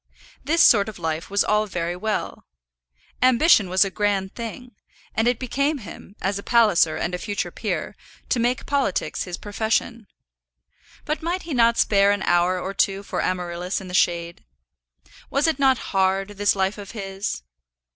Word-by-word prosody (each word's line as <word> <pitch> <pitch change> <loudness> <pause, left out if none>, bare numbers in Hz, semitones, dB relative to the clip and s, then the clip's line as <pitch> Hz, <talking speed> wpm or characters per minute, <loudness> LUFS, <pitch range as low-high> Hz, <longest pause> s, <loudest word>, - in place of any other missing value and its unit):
This 335 +3 +3
sort 205 -2 +5
of 215 - -10
life 160 -1 -3
was 200 0 +2
all 210 0 +1
very 175 -2 -3
well. 215 +3 -3 0.7
Ambition 255 - +5
was 185 +2 +4
a 195 - -4
grand 200 -2 -1
thing, 240 +2 -7 0.4
and 225 +1 +1
it 245 -1 +2
became 280 +5 -1
him, 200 -2 -11
as 200 +1 -1
a - - -6
Palliser 205 -9 +3
and 175 +3 -2
a 180 - -2
future 205 +1 -3
peer, - - -4 0.3
to 250 - +1
make 240 +2 0
politics 275 -9 -1
his 175 -1 -5
profession. 220 +1 -2 1.0
But 305 - -2
might 345 +3 -2
he 330 - -5
not 235 -2 +3
spare 200 -1 +4
an 205 -1 +1
hour 175 +1 +2
or 190 +2 -4
two 195 0 0
for - - -3
Amaryllis 180 0 -2
in 190 -2 -10
the - - -8
shade? 170 -1 0 0.9
Was 280 +1 +1
it 320 -2 +1
not 265 -2 +4 0.2
hard, 195 +1 +1
this 205 0 +1
life 195 +2 -1
of 200 +1 -9
his? 195 - -4
205 Hz, 170 wpm, -23 LUFS, 185-235 Hz, 1.0 s, sort